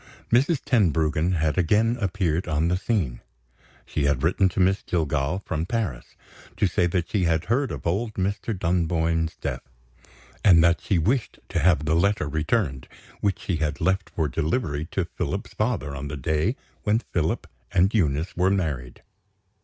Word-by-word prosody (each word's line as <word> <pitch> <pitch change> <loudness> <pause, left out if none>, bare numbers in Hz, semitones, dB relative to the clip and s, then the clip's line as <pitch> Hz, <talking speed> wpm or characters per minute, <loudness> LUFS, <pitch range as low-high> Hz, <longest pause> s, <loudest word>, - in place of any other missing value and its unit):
Mrs. 135 +5 +3
Tenbruggen 80 - +2
had 80 0 +1
again 110 +7 +3
appeared 90 -4 0
on 80 +1 +1
the 90 - +2
scene! 90 - -1 0.6
She 75 - -1
had 70 -1 +1
written 95 +3 +3
to - - -4
Miss 95 +2 +3
Jillgall, 80 +2 -1
from 80 +2 -2
Paris, 100 - -3 0.4
to - - +2
say 90 -1 +2
that 85 -1 -2
she 95 -4 +1
had 80 0 +1
heard 130 +3 +1
of - - -6
old 105 +6 -1
Mr. 100 +2 -2
Dunboyne's 85 -2 0
death, - - -4 0.8
and 85 -5 +7
that 85 -1 +3
she 95 - +1
wished 115 - 0
to 85 - -1
have 75 -2 +3
the 80 - +1
letter 100 -2 +2
returned, 75 - -1 0.3
which 100 -4 0
she 90 - -1
had 75 -2 -2
left 95 +2 0
for 80 -2 -1
delivery 75 - -1
to - - -1
Philip's - - -4
father 70 +1 -1
on 70 +1 -5
the 75 +1 -5
day 80 - 0 0.3
when 105 +1 +2
Philip 85 -8 -2 0.3
and 95 +4 +3
Eunice 80 -5 0
were 90 +2 +3
married. 75 -11 -2
85 Hz, 165 wpm, -25 LUFS, 75-100 Hz, 0.8 s, and